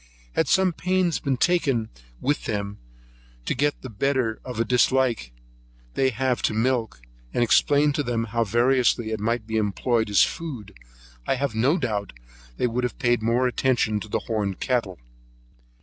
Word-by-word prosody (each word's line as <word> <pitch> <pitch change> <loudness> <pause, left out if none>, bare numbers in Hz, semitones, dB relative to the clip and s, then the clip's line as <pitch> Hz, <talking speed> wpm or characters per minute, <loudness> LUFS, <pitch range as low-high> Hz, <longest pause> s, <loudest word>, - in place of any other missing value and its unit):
Had - - +1
some 190 -2 +3
pains 180 0 0
been 135 -3 -1
taken 135 -9 +1 0.3
with 145 +2 -1
them, 100 -1 -3 0.7
to - - 0
get 145 +3 -1
the 130 - -6
better 125 0 0
of 125 -3 -6
a 115 - +2
dislike 125 - +2 0.6
they 135 - +2
have 130 +1 -1
to 110 - 0
milk, 115 - 0 0.4
and 120 - +3
explained 145 +5 +3
to 145 - 0
them 120 -4 -1
how 115 +1 0
variously 120 +1 +2
it 110 - -2
might 115 +1 -1
be 110 0 -2
employed 110 +2 0
as 100 - +5
food, 125 - -5 0.5
I - - +2
have 140 -2 -2
no 130 +10 +2
doubt 105 - -2
but - - -24
they - - +1
would 125 +1 -1
have 125 - -2
paid 120 -4 +1
more 115 +3 +2
attention 125 -4 +1
to 110 - -8
the - - -2
horned 105 -5 -2
cattle. 115 -8 -1
120 Hz, 170 wpm, -24 LUFS, 110-130 Hz, 0.7 s, as